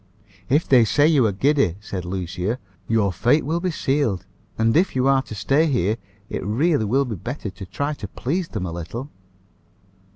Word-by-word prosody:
"If 145 +5 +2
they 125 -3 +6
say 145 +7 +3
you 140 -8 +4
are - - +1
giddy," 135 - +2
said 95 -3 -6
Lucia, 95 +4 -2 0.3
"your 105 -4 +2
fate 120 - +2
will 165 +4 0
be 185 +1 -1
sealed; 135 - 0 0.3
and, 115 0 +2
if 175 0 +3
you 130 0 +2
are 135 -1 +4
to 110 - -9
stay 135 +11 +2
here, 110 - +1 0.3
it - - -4
really 120 - +1
will 135 +7 +2
be 120 - -4
better 115 - -5
to 95 +1 -9
try 145 +10 -2
to 110 -8 -7
please 165 - -2
them 105 - -4
a 85 - -4
little." 90 - -6
120 Hz, 190 wpm, -22 LUFS, 100-145 Hz, 0.3 s, they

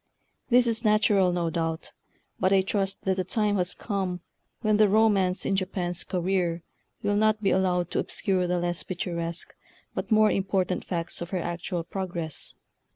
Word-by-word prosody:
This 245 0 +5
is 230 0 -1
natural, 210 -3 +4
no 170 -2 -1
doubt; 165 -1 -2 0.5
but 185 - +2
I 195 -1 +5
trust 195 0 -1
that 190 -1 +1
the 185 - +1
time 205 +2 +1
has 180 0 -1
come 190 -4 -3 0.4
when 215 -1 +3
the 215 -1 +5
romance 200 -3 +3
in 195 - +1
Japan's 185 -2 -2
career 175 -2 -1 0.4
will 205 0 +1
not 215 0 +2
be 195 - +3
allowed 180 -2 +1
to - - 0
obscure 185 -2 0
the 180 0 +1
less 175 0 -1
pictu 180 -1 -4
resque 170 0 -3 0.4
but - - -4
more 215 0 +5
important 190 -2 0
facts 170 -2 -3
of 170 - -4
her 190 - -1
actual 175 0 -3
progress. 175 -3 -4
185 Hz, 170 wpm, -27 LUFS, 175-205 Hz, 0.5 s, This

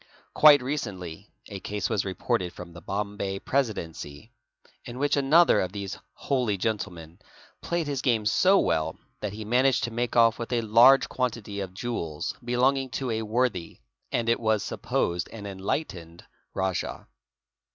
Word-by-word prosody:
Quite 145 -3 +7
recently 100 - -5 0.2
a 100 -2 -7
case 105 +1 -3
was 100 - -1
reported 95 -1 -2
fron 90 -1 -9
1 - - -16
the 85 - -11
Bombay 100 +1 -3
Presidency 95 - -3 0.5
in 120 0 -8
which 145 +2 +1
another 150 +5 +5
of 95 0 -3
these 100 -2 -5
holy 125 -7 -1
gentlemen 90 -5 -4 0.4
played 170 -1 -1
his 140 -3 -2
game 115 -5 +1
so 185 - +4
well 80 - 0 0.2
that 105 -2 -4
he 110 0 -7
managed 125 +4 +2
to 120 - -2
make 120 +1 -2
off 115 -1 +5
with 115 - -5
a 120 - +2
large 120 +5 +6
quantity 115 -5 -3
of 95 -2 -6
jewels 90 -10 -3
belonging 130 +2 +1
to 125 0 -3
a 110 0 -1
worthy 110 -5 -1 0.3
and 115 - -1
it 115 - +2
was 110 -3 +1
supposed 85 +1 -2
an 105 -3 -9
enlightened 95 - -4 0.3
rajah. 95 -2 -2
110 Hz, 155 wpm, -26 LUFS, 95-125 Hz, 0.5 s, Quite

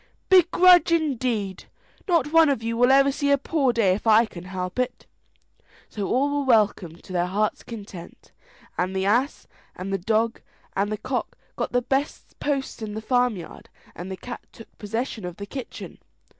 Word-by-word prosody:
"Begrudge, 365 -1 +6
indeed! 250 - -1 0.4
Not 330 -5 +2
one 325 -2 +6
of 265 -5 -1
you 230 0 -2
will 245 +2 +4
ever 275 +1 +5
see 285 +1 -1
a 280 - +5
poor 275 -2 +1
day 220 -6 +2
if 210 +4 -4
I 220 +1 +6
can 180 -5 -11
help 185 +3 -5
it." 250 0 -2 0.8
So 205 -3 -4
all 285 +3 +1
were - - -1
welcomed 205 - +1
to 185 - -10
their 175 0 +1
heart's 210 +3 -1
content, 200 -6 -10 0.5
and 185 +2 -1
the 190 0 0
ass 245 +8 +1 0.3
and 195 +2 -5
the 195 - 0
dog 220 +4 0 0.3
and 200 +2 0
the 215 - -2
cock 255 +4 -4 0.2
got - - -3
the 245 0 +1
best 275 +4 -3
posts 275 -4 -2
in 210 -1 -5
the - - -3
farmyard, 245 -8 -1 0.3
and 180 +2 -7
the 190 - -5
cat 245 +4 -8
took 225 - -15
possession 225 +1 -4
of 180 -1 -6
the 200 - -6
kitchen. 260 +4 -8
230 Hz, 180 wpm, -24 LUFS, 195-275 Hz, 0.8 s, Begrudge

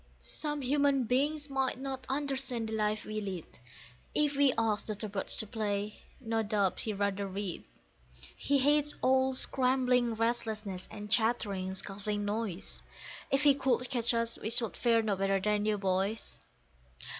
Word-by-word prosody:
Some 295 - +2
human 280 0 +2
beings 290 +5 0
might 270 -2 -1
not 265 -1 -5
understand 265 -4 0
the - - -4
life 215 0 0
we 215 0 -3
lead; 190 -5 -5 0.7
If 295 -1 +2
we 280 -1 +5
asked 220 -2 0
Dr. 215 0 -3
Birch 200 -1 -3
to - - +1
play, 210 -2 -3 0.2
no 225 0 -1
doubt 205 -3 0
he'd 215 - -2
rather 200 0 -1
read; 195 -2 -4 0.7
He 280 - +1
hates 295 +2 +2
all 260 0 +3
scrambling 250 -2 +2
restlessness, 220 -4 -2
and 210 -1 -8
chattering, 200 -5 +1
scuffling 205 +2 -2
noise; 205 -3 -3 0.5
If 275 +1 +2
he 290 -1 +7
could 265 -2 0
catch 235 -2 +1
us 230 0 0
we 220 - -3
should 230 -2 +2
fare 230 -2 +3
no 210 -2 0
better 195 0 +1
than 210 +1 0
you 215 -1 +2
boys. 195 +2 -1
225 Hz, 155 wpm, -31 LUFS, 205-260 Hz, 0.7 s, he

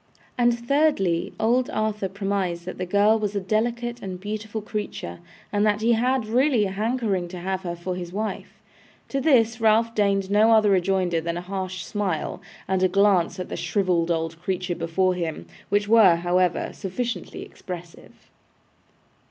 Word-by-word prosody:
And, 240 -1 +1
thirdly, 275 - +2
old 245 +4 +2
Arthur 215 -5 -1
premised 195 -3 -2
that 185 - -7
the 185 - -3
girl 205 +4 +4
was 210 -1 -2
a - - +1
delicate 235 +4 -1
and 185 -2 -6
beautiful 215 +2 -5
creature, 210 - -5 0.3
and 205 0 +2
that 210 0 +2
he 230 +2 +3
had 250 +1 +1
really 245 0 +2
a 190 - -3
hankering 210 -3 -1
to 180 +1 -8
have 190 +1 -3
her 175 -2 -4
for 175 +2 -4
his 175 -1 -6
wife. 215 +3 -5 0.5
To 275 - -1
this 235 -6 +3
Ralph 225 +1 +3
deigned 200 -2 +1
no 215 +2 +5
other 215 -2 +5
rejoinder 185 -2 +1
than 170 +1 -3
a - - -3
harsh 185 -1 -4
smile, 195 -7 -2 0.3
and 190 -1 0
a 185 - +5
glance 190 -1 +2
at 180 - -5
the - - -4
shrivelled 180 -4 0
old 165 0 -2
creature 185 -1 -2
before 170 +2 0
him, 165 - -4 0.2
which 205 +1 +1
were, 210 -6 +6
however, 175 +1 +1
sufficiently 230 +5 -4
expressive. 175 -2 -11
200 Hz, 165 wpm, -24 LUFS, 180-220 Hz, 0.5 s, were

